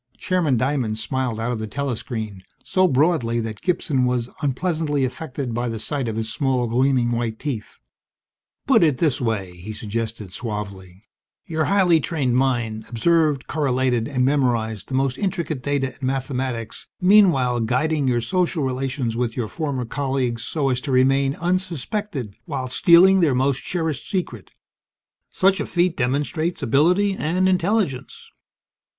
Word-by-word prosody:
Chairman 170 -8 +1
Diamond 125 -4 0
smiled 120 0 -2
out 115 +2 -1
of 120 - -3
the 110 - -4
telescreen, 110 -6 -4 0.2
so 185 -1 +2
broadly 135 -5 +2
that 110 -2 -5
Gibson 165 -7 0
was 125 -1 -1
unpleasantly 145 0 0
affected 130 -2 -5
by 120 +1 -1
the 115 - -4
sight 125 +4 -3
of 110 - -3
his 110 -1 -3
small, 130 -3 +1
gleaming, 125 +1 +2
white 115 -2 -2
teeth. 125 -7 -5 0.9
"Put - - +5
it 150 -5 +3
this 150 -5 +1
way," 110 -6 -1
he 100 +5 -7
suggested 110 -2 -4
suavely. 100 -4 -6 0.4
"Your 160 -4 -1
highly 185 -4 +4
trained 140 -5 -1
mind 120 -4 0
observed, 150 +3 +2
correlated, 130 -5 0
and 125 -3 0
memorized 120 -6 0
the 130 - -3
most 135 -1 0
intricate 170 -8 -2
data 140 -1 -1
and - - -24
mathematics, 130 -3 -3
meanwhile 180 -11 +4
guiding 135 +5 0
your 120 -2 +2
social 180 +2 0
relations 130 -2 -2
with 120 0 -2
your 120 -3 -1
former 140 -3 -3
colleagues 130 -2 -2
so 140 0 -1
as 125 -1 0
to 140 - -4
remain 135 +2 +3
unsuspected 175 - -2
while 135 -5 -3
stealing 175 +8 +6
their 155 -7 +3
most 135 +1 +1
cherished 160 -6 -3
secret. 185 -3 -3 0.8
Such 190 +1 +2
a - - -1
feat 175 -1 +1
demonstrates 145 +6 -1
ability 175 - +3
and 185 +1 0
intelligence." 180 - -1
130 Hz, 145 wpm, -22 LUFS, 120-160 Hz, 0.9 s, stealing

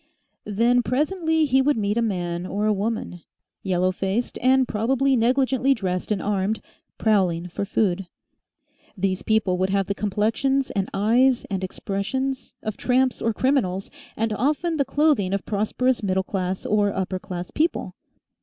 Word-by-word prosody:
Then 235 +4 +3
presently 320 +6 +1
he 265 -1 +3
would 290 -1 +2
meet 205 -1 0
a 235 - +1
man 175 -5 -2
or 205 +2 -1
a 215 - +3
woman, 205 -3 -3 0.4
yellow 185 -1 +1
faced 195 +5 -2
and 260 0 +4
probably 265 +5 +1
negligently 260 +2 +2
dressed 185 -2 -3
and 205 - +1
armed 205 +2 -1 0.4
prowling 180 -5 +1
for 200 - -3
food. 195 -3 0 0.9
These 190 0 0
people 210 -5 +1
would 190 +1 +1
have 195 0 +1
the 200 - -1
complexions 220 +7 0
and 195 -1 -1
eyes 240 +5 +3
and 190 -1 -2
expressions 250 +8 -3
of 215 -1 -4
tramps 255 0 +1
or 230 - +1
criminals, 215 -6 0 0.3
and 225 0 0
often 300 - 0
the 280 - +2
clothing 285 -12 +2
of 200 - -4
prosperous 225 +5 0
middle 190 -2 0
class 185 -1 -3
or 205 -1 +2
upper 190 -1 -2
class 180 -1 -6
people. 325 +3 -1
215 Hz, 155 wpm, -24 LUFS, 190-260 Hz, 0.9 s, and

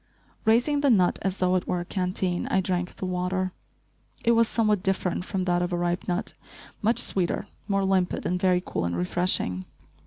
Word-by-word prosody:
Raising 245 +6 +3
the 285 - +3
nut 185 -7 +3
as 195 0 -1
though 185 0 +2
it 185 -1 0
were 180 - 0
a - - -6
canteen, 180 -1 -1
I - - +2
drank 180 -1 -2
the - - -5
water. 185 +1 -1 0.7
It 235 - +5
was 230 -1 +4
somewhat 215 -4 +1
different 185 -2 -1
from 190 -1 -2
that 175 -1 +1
of 175 +1 -1
a 175 - 0
ripe 175 +1 -1
nut, 180 +3 -2 0.5
much 225 +3 +2
sweeter, 180 -3 +2 0.2
more 195 -1 +1
limpid 190 -2 +1
and 180 +1 -1
very 180 -1 +3
cool 85 - -2
and 85 0 -2
refreshing. 95 - 0
185 Hz, 190 wpm, -26 LUFS, 175-195 Hz, 0.7 s, It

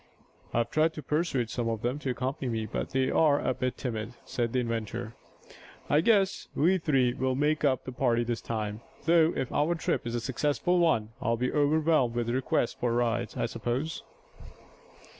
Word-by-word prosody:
"I've 120 0 0
tried 160 +1 +2
to 150 - -6
pursuade 140 -6 0
some 120 -2 -1
of 110 -2 -3
them 125 +4 -1
to 140 - -3
accompany 130 +2 -2
me, 110 -1 -2
but 110 - -4
they 130 0 +1
are 150 -3 +4
a 130 - 0
bit 130 0 -2
timid," 115 -3 -4
said 120 -2 -2
the 130 - +1
inventor. 115 -1 -3 0.8
"I 150 - +5
guess 195 -1 +2
we 185 +5 +3
three 135 -7 +2
will 130 +1 -1
make 150 +3 +1
up 130 -4 +2
the 130 - -6
party 120 -2 +1
this 120 -1 -3
time, 110 -1 -3 0.2
though 165 0 +5
if 130 - -2
our 155 +4 +1
trip 160 - -1
is 115 - -2
a - - 0
successful 145 +8 0
one 135 -11 +2
I'll 115 +1 +1
be 125 +2 -1
overwhelmed 150 -4 +2
with 120 -1 -1
requests 125 -1 0
for 120 - -1
rides, 120 -1 0
I - - 0
suppose." 120 +7 -3
125 Hz, 185 wpm, -29 LUFS, 115-150 Hz, 0.8 s, I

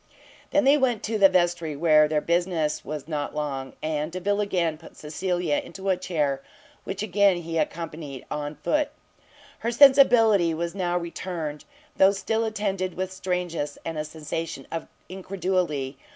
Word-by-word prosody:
They 295 - +3
then 280 0 +4
went 240 -5 +1
to 220 0 -1
the 195 -1 +8
vestry, 175 -4 +1
where 155 0 +5
their 150 0 0
business 170 -3 0
was 150 0 -6
not 150 -3 -3
long; 135 -3 -3
and 155 0 -1
Delvile 200 +3 0
again 170 -6 0
put 165 - -15
Cecilia 180 - -1
into 195 -7 -6
a 190 - +4
chair, 150 -7 -1 0.4
which 195 +2 -4
again 200 -2 +3
he 165 0 -2
accompanied 155 -3 -4
on 150 0 -3
foot. 300 - 0 0.7
Her 230 - -1
sensibility 235 - +6
now 175 +2 -2
soon 175 - +1
returned, 165 -3 -5 0.3
though 195 +1 +6
still 220 +3 -1
attended 195 -4 -2
with 185 +1 -3
strangeness 180 -5 -3
and 165 -2 -3
a - - -1
sensation 155 -2 -5
of 165 -1 -4 0.2
incredulity. 180 -7 -2
175 Hz, 150 wpm, -25 LUFS, 155-195 Hz, 0.7 s, the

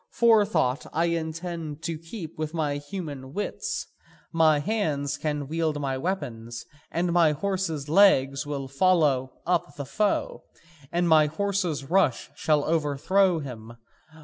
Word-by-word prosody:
Forethought 205 - +3
I 165 +2 +2
intend 165 -1 -4
to 165 -1 -2
keep 165 0 -8
with 155 +1 -3
my 150 -3 0
human 145 -4 -7
wits, 205 - -3 0.5
my 160 -2 +5
hands 145 -6 -1
can 150 -2 -3
wield 160 -1 -1
my 135 -2 -1
weapons, 125 -8 -4 0.2
and 170 0 -1
my 165 -3 +4
horse's 165 -3 -2
legs 145 -6 +4
will 140 -2 -4
follow 145 -4 +2 0.2
up 170 -4 0
the 140 - -5
foe, 210 +9 -1 0.5
and 175 0 +1
my 155 -2 +6
horse's 180 -2 -1
rush 170 -8 +1 0.2
overthrow 160 +4 +2
him. 115 -4 -8
155 Hz, 125 wpm, -26 LUFS, 145-175 Hz, 0.5 s, my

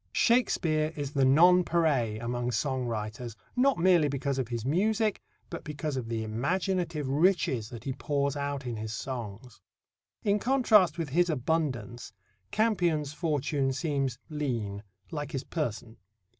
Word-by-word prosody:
Shakespeare 160 -10 +2
is 145 -2 -4
the 140 -2 +1
nonpareil 160 -6 +4
among 120 +1 -2
song 130 +2 -1
writers, 115 +1 -4 0.2
not 270 +2 +3
merely 175 -3 +4
because 140 -1 -2
of 130 - -1
his 120 -1 -4
music, 210 - +1 0.3
but 170 - -7
because 150 -1 -4
of 120 -3 -4
the 115 -1 -2
imaginative 165 - -1
riches 145 - +2
that 115 -3 -9
he 135 - -2
pours 140 +1 -1
out 140 -1 -3
in 120 -2 -3
his 110 0 -5
songs. 120 -1 -6 0.6
In 205 0 +2
contrast 215 - +4
with 165 -4 -3
his 175 +5 +2
abundance, 130 -7 -2 0.4
Campion's 175 -10 +1
fortune 145 -4 0
seems 135 -3 -1
lean, 120 -10 -3 0.3
like 150 -1 -5
his 135 -1 -2
person. 115 -7 -4
145 Hz, 140 wpm, -29 LUFS, 125-170 Hz, 0.6 s, nonpareil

